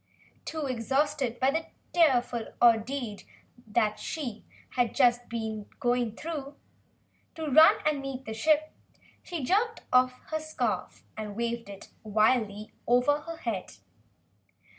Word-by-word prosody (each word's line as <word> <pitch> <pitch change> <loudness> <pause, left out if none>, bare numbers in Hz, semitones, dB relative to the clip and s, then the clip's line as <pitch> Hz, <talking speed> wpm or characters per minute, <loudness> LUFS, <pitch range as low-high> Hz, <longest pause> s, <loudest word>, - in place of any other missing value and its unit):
Too 315 -2 -3
exhausted 265 +1 0
by 265 +1 +3
the 320 +2 -1 0.3
dreadful 250 -8 +3
ordeal 235 -1 +2 0.8
she 245 -9 -5 0.3
had 245 -2 0
just 245 -2 +3
been 220 -2 -4 0.2
through 270 +5 -1 0.8
to 320 -2 -4
run 310 +3 +6
to 305 - +3
meet 275 -2 -5
the 220 - -5
ship, 310 +7 +2 0.5
she 340 -6 -5
jerked 440 - +1
off 255 0 +5 0.2
her 315 - 0
scarf 310 0 -3
and 210 -2 -6
waved 235 -1 -3
it 200 0 -10
wildly 215 -1 +1
over 250 +5 +4
her 330 +2 -8
head. 225 - -4
255 Hz, 120 wpm, -29 LUFS, 230-300 Hz, 0.8 s, run